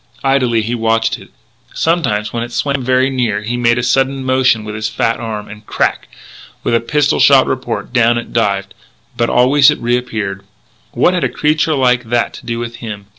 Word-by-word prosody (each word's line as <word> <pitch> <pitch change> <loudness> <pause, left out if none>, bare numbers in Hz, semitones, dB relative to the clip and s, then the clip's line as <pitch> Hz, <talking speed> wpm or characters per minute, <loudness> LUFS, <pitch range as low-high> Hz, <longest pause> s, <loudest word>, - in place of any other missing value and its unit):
Idly 130 -5 +2
he 115 +3 -3
watched 115 -1 0
it. - - -15 0.5
Sometimes, 120 -11 0
when 120 - -2
it 120 +1 -5
swam 140 +2 -1
very 130 +1 +2
near, 115 -6 -1
he 115 +3 -3
made 120 0 +2
a 125 - -1
sudden 135 +2 +1
motion 130 -4 +2
with 105 0 -6
his 110 0 -3
fat 115 +1 -1
arm; 110 -2 -5
and 105 +1 -11
crack! - - -1 0.6
with - - 0
a 115 - +4
pistol 145 +5 0
shot 135 -2 +6
report 120 -4 -4
down 120 -1 +3
it 120 - -6
dived. 100 -4 0 0.4
But 120 0 0
always 140 +4 +5
it 150 - +1
reappeared. 115 -5 -2 0.5
What 180 - +2
had 180 -4 -1
a 130 - +1
creature 155 +3 +1
like 125 -2 +2
that 120 +1 0
to - - -12
do 115 -1 -2
with 120 0 -5
him? 105 -3 -8
120 Hz, 195 wpm, -15 LUFS, 115-130 Hz, 0.6 s, shot